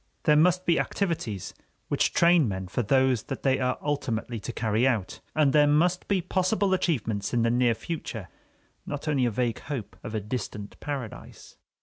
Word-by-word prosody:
There 150 - +5
must 180 +4 +4
be 170 - +3
activities 155 - -2 0.3
which - - +1
train 170 -5 +4
men 95 -2 -4
for 125 - -1
those 130 0 +3
that 135 - -6
they 135 -1 +2
are 130 0 0
ultimately 120 -5 -2
to 115 - -5
carry 115 +2 +1
out, 110 -8 -1 0.2
and 150 -3 +3
there 150 -1 +6
must 170 +5 +2
be 190 -3 +1
possible 190 +2 +1
achievements 115 - -1
in 120 - +2
the 115 - +2
near 120 -1 +3
future, 115 - -5 0.6
not 145 +2 -6
only 140 -4 +2
a - - +2
vague 120 +1 -1
hope 135 -8 -6
of 110 - -5
a - - +1
distant 105 -1 -5
paradise. 140 -6 -7
130 Hz, 180 wpm, -27 LUFS, 115-155 Hz, 0.6 s, there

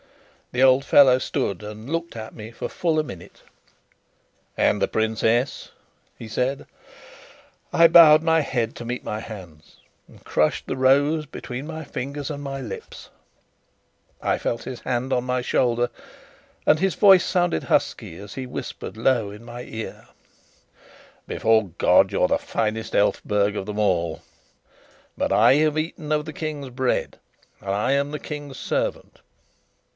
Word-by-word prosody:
The 125 +1 +1
old 130 +1 +5
fellow 135 -3 +6
stood 100 -6 -2
and 105 +4 -9
looked 165 -4 -3
at 110 0 -7
me 110 +1 -9
for - - -5
full 165 -3 0
a - - +1
minute. 90 - -11 1.1
"And - - +2
the - - +3
princess?" 110 +3 0 0.5
he 115 - -9
said. 125 +5 -2 1.1
I 165 - +6
bowed 160 -2 +8
my 165 0 +3
head 125 -5 -2
to - - -7
meet 120 +2 -4
my 105 - -4
hands, 90 -9 -11 0.3
and - - -18
crushed - - +1
the - - -3
rose 140 +4 +3
between 135 0 -7
my 160 0 -6
fingers 140 +3 -5
and 145 -1 -6
my 135 -1 -5
lips. 125 -4 -8 1.1
I - - +1
felt 115 - -3
his 130 -2 -7
hand 130 +1 -2
on 125 - +1
my 125 0 -1
shoulder, 120 -1 +1 0.8
and 155 - +4
his 190 -3 +1
voice 195 -3 +7
sounded 175 - 0
husky 80 - -1
as 100 0 -10
he 130 - -5
whispered 125 - -7
low 115 -3 +1
in 105 +3 -11
my 120 0 -8
ear: 115 -2 -8 1.2
"Before 110 -3 +2
God, - - +4
you're - - +2
the - - +1
finest 110 0 -3
Elphberg 105 0 +1
of 95 - -4
them 105 0 -4
all. 85 -6 0 0.9
But - - -1
I - - +6
have 155 0 +2
eaten 155 -1 -4
of 150 0 +1
the 155 - -7
King's 150 -4 -5
bread, 130 +1 -1 0.4
and 100 - -7
I 105 +6 0
am 140 +1 0
the 150 - -4
King's 145 -3 -7
servant. - - -3
130 Hz, 155 wpm, -23 LUFS, 110-150 Hz, 1.2 s, bowed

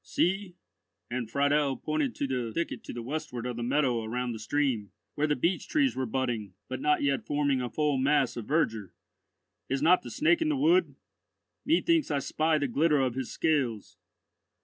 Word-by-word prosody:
"See," 190 0 -1 0.6
and 120 -2 -3
Friedel 145 0 +2
pointed 155 -4 -1
to - - -2
the 125 -3 -2
thicket 170 +8 -3
to - - -6
the 120 - -6
westward 135 -3 -4
of 125 -1 -3
the 120 - -5
meadow 125 -1 +1
around 125 +2 -2
the 110 - -6
stream, 115 -3 -1 0.2
where 150 +1 0
the 150 - +1
beech 170 +7 0
trees 275 -4 +2
were 130 -1 -2
budding, 115 -6 -2
but 130 0 -5
not 150 -1 +2
yet 140 -1 +1
forming 140 -3 0
a 125 - -3
full 150 -1 0
mass 140 -1 +2
of 120 - -5
verdure, 115 - 0 0.7
"is 135 +1 -1
not 180 +3 +5
the - - -9
Snake 330 +2 +2
in 320 - +2
the 300 - +1
wood? 335 +6 +3 0.7
Methinks 330 0 +3
I 145 - +1
spy 155 +3 +1
the 145 -2 0
glitter 150 +4 +2
of 130 -3 +1
his 130 -1 -4
scales." 130 -10 -1
140 Hz, 190 wpm, -29 LUFS, 125-155 Hz, 0.7 s, not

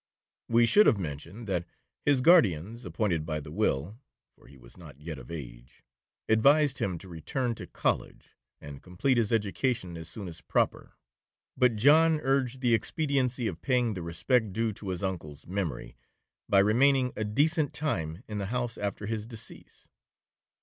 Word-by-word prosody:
We 115 0 +5
should 210 - +5
have 110 - +4
mentioned, 85 +6 -6
that 90 -3 -2 0.4
his 145 -3 +3
guardians 115 - +3
appointed 90 -8 -1
by 80 -1 -3
the 75 0 -10
will 80 - -1 0.4
(for - - -21
he 70 - -16
was - - -15
not 65 - -13
yet 75 -2 -7
of - - -13
age) 60 -6 -9 0.4
advised 140 +6 +4
him 90 -3 -1
to 95 - -11
return 95 - -3
to - - -9
College, - - -2 0.3
and 70 -1 -10
complete 95 +9 0
his 110 -1 0
education 110 -3 -1
as 80 - -8
soon 100 -4 -7
as 80 -1 -9
proper; - - -1 0.6
but 125 -3 +3
John 155 +7 +5
urged 135 -2 0
the 120 -2 +3
expediency 130 0 0
of - - -4
paying 125 -4 +1
the 90 - -5
respect 100 +6 0
due 115 +1 0
to 100 0 -8
his 90 0 -4
uncle's 80 -6 -5
memory, 90 -8 -4 0.5
by 100 - +4
remaining 125 +6 +4
a 110 - -2
decent 145 - +1
time 90 - -3
in 105 -1 -4
the 100 - -3
house 120 +1 -3
after 100 0 -3
his 110 0 -3
decease. 115 -2 -11
105 Hz, 165 wpm, -29 LUFS, 85-125 Hz, 0.6 s, We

